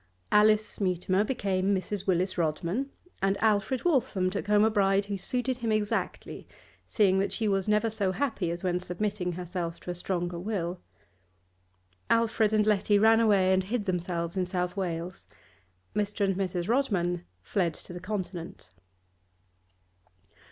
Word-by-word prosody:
Alice 215 0 +3
Mutimer 185 +1 +1
became 200 -4 0
Mrs. 190 +1 -4
Willis 185 0 +1
Rodman, 170 - -1 0.3
and 195 +1 +2
Alfred 220 - +1
Waltham 220 - +1
took 205 +1 -4
home 210 0 +4
a 220 - +3
bride 195 -1 +2
who 200 0 -3
suited 250 +6 -1
him 230 -3 -2
exactly, 215 -1 -2 0.4
seeing 190 -3 +3
that 195 - 0
she 220 - -1
was 195 -1 0
never 210 +2 +2
so 200 -3 0
happy 220 -6 -1
as 170 +2 -3
when 180 -1 0
submitting 180 0 -2
herself 175 -1 -4
to 180 - -5
a - - -3
stronger 175 -1 -3
will. 180 -3 -3 1.3
Alfred 225 -2 +2
and 215 -1 +3
Letty 210 -1 +3
ran 225 +2 +5
away 200 -4 +4
and 190 0 +2
hid 215 +1 -2
themselves 175 -2 -2
in 185 -2 0
South 180 0 -2
Wales. 175 -2 -4 0.7
Mr. 205 0 0
and 195 -1 0
Mrs. 180 -2 -2
Rodman 190 -9 0 0.2
fled 170 - 0
to - - -9
the 180 - -6
Continent. 180 - -6
195 Hz, 150 wpm, -28 LUFS, 180-210 Hz, 1.3 s, ran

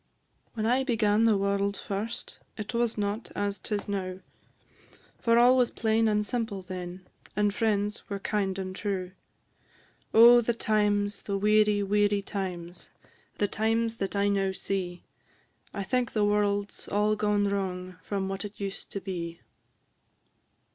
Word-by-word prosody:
When 220 -1 -1
I 250 +4 +3
began 225 -3 +2
the 220 -3 +4
world 200 0 0
first, 210 +4 -4 0.2
It 210 +2 -5
was 235 -1 0
not 205 +2 -2
as 200 -1 -1
'tis 205 0 -3
now; 190 -2 -3 1.0
For 230 -1 +3
all 245 +2 +7
was 250 -2 +3
plain 225 0 +1
and 210 -1 +1
simple 220 -4 -2
then, 180 0 -7 0.3
And 205 0 +2
friends 210 -1 -1
were 200 - -2
kind 195 -1 -1
and 185 -1 -4
true: 190 -3 -3 1.0
Oh, 240 +2 +8
the 235 0 0
times, 205 -2 +1
the 200 -1 -2
weary, 210 0 +3
weary 205 0 +2
times! 180 -3 -5 0.5
The 205 - +2
times 225 +2 0
that 195 -1 -3
I 200 0 +2
now 195 -1 +1
see; 185 -2 -3 0.7
I 200 - -4
think 245 +5 -1
the 210 -2 +2
world 205 -1 +1
's - - -12
all 210 +1 +2
gone 210 -1 +1
wrong, 185 -2 -3
From 195 +1 -2
what 195 +1 -4
it 205 0 -8
used 195 -1 -5
to 200 - -3
be. 170 -3 -5
205 Hz, 150 wpm, -28 LUFS, 195-215 Hz, 1.0 s, Oh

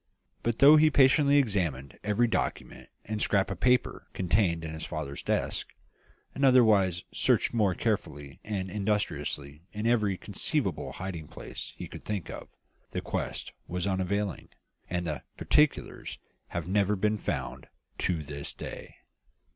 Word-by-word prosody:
But 115 -1 -1
though 145 +3 +9
he 155 +1 +6
patiently 140 +1 +5
examined 85 - 0
every 105 +3 +2
document 115 - -3 0.2
and 105 0 -3
scrap 100 -1 +2
of 95 - -5
paper 125 -1 +2
contained 90 -3 +1
in 80 - -5
his 80 - -6
father's 80 -4 -5
desk, - - -2 0.6
and 140 - -3
otherwise 105 -9 +5
searched - - +2
most 100 -6 +2
carefully 75 -11 -2
and 95 -3 -3
industriously 80 -8 -2
in 105 +1 -4
every 105 -5 +2
conceivable - - -1
hiding 90 -5 -6
place - - -8
he - - -6
could - - -10
think 100 -5 -4
of, - - -8 0.4
the - - -3
quest - - -4 0.2
was 90 +1 -2
unavailing, 100 0 -1 0.4
and 90 -1 -1
the 75 -5 -3 0.2
particulars 150 -1 +1 0.3
have 85 -1 -4
never 100 +1 +2
been 105 +2 +1
found, - - -4 0.3
to 85 -4 0
this 70 0 -5
day!" - - -8
100 Hz, 140 wpm, -29 LUFS, 85-110 Hz, 0.6 s, though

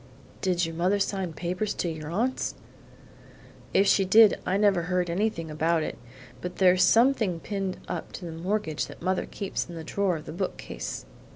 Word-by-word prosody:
"Did 180 -2 +1
your 165 - -5
mother 180 +5 +2
sign 195 -3 -1
papers 180 +6 -2
to - - -1
your 160 -2 -5
aunts?' 235 +9 -1 1.2
"If 195 - +4
she 195 0 +4
did 215 +3 +6
I 190 - +2
never 200 -3 +3
heard 180 -2 +1
anything 170 -4 -1
about 160 +1 +1
it; - - -4 0.5
but 180 0 -5
there's 185 -1 +4
something 225 -7 +4
pinned 195 0 -3
on 175 -3 -4
to 180 - -7
the 170 - -5
mortgage 165 -1 -2
that - - -12
mother 185 +1 0
keeps 195 -3 -4
in 170 - -7
the 165 - -6
drawer 185 +1 0
of 155 - -10
the - - -7
bookcase." 185 +2 -4
180 Hz, 180 wpm, -27 LUFS, 170-200 Hz, 1.2 s, did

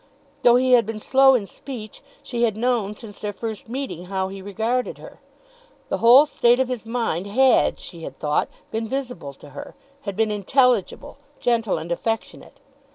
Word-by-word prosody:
Though 240 0 +6
he 255 +1 +3
had 240 -4 +5
been 225 -1 -4
slow 270 +3 +5
in 220 -5 0
speech, 215 +2 -9 0.2
she 240 -2 -4
had 220 -3 +1
known 225 -4 0
since 210 -2 -11
their 210 - -3
first 220 +1 -6
meeting 255 - -5
how 190 0 -2
he 195 0 -8
regarded 225 +6 -2
her! - - -13 0.7
The - - -1
whole 250 +5 +8
state 245 -4 +3
of 260 -1 +1
his 240 -3 -4
mind 225 -6 -2
had, 260 +5 +3
she 170 -3 -9
had - - -8
thought, 150 0 0 0.2
been 225 0 -2
visible 250 - -5
to 145 +1 -15
her, 145 - -9 0.3
had 200 -7 -5
been 220 -1 +2
intelligible, 240 +2 +1 0.2
gentle, 230 -6 +1
and 160 +2 -6
affectionate. 225 +6 -4
225 Hz, 175 wpm, -23 LUFS, 200-250 Hz, 0.7 s, whole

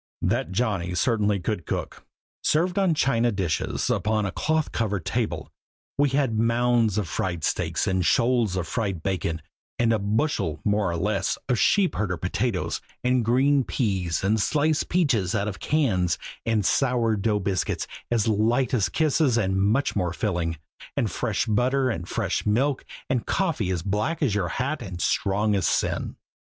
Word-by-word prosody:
That 120 +6 0
Johnny 95 -4 -1
certainly 105 +2 +1
could 90 -1 -3
cook! - - -4 0.4
Served 175 +5 +2
on 185 -5 +2
china 120 -4 +2
dishes 95 -6 -1
upon 105 0 0
a 95 - -2
cloth 155 - 0
covered 100 -6 -2
table, - - -2 0.4
we 145 0 +3
had 130 -5 +1
mounds 115 -2 +2
of 105 -5 0
fried 90 -3 -2
steaks - - 0
and 95 -1 +1
shoals 115 -1 +2
of 90 -2 -2
fried 100 -8 -2
bacon; 85 -5 -2 0.3
and 115 -1 +3
a 110 - +1
bushel, 100 - 0
more 105 -2 +2
or 85 - -2
less, 95 +1 0
of 125 -3 +1
sheepherder 105 - +2
potatoes; 95 +3 -2 0.2
and 125 -1 +2
green 135 +4 +3
peas 95 -10 -1
and 105 +2 +2
sliced 155 +6 +1
peaches 130 - +1
out 100 -1 0
of 95 -4 -5
cans; 100 - +1 0.3
and 110 -3 +1
sour 120 0 +2
dough 105 +1 0
biscuits 95 -3 -1 0.2
as 115 -3 +1
light 115 +4 +2
as 110 -6 +2
kisses 155 -5 +2
and 95 -3 +1
much 110 +8 +1
more 90 -4 0
filling; 85 -5 -1 0.4
and - - 0
fresh - - -1
butter 130 +4 +1
and 85 -6 -5
fresh - - -1
milk; 130 +6 +1 0.2
and 130 -3 -1
coffee 165 - 0
as 90 -3 -1
black 105 - -1
as 125 -8 +2
your 100 -4 0
hat 140 - -2
and 90 -2 -7
strong 105 +4 +1
as 95 -3 +1
sin. - - -1
110 Hz, 165 wpm, -25 LUFS, 95-125 Hz, 0.4 s, we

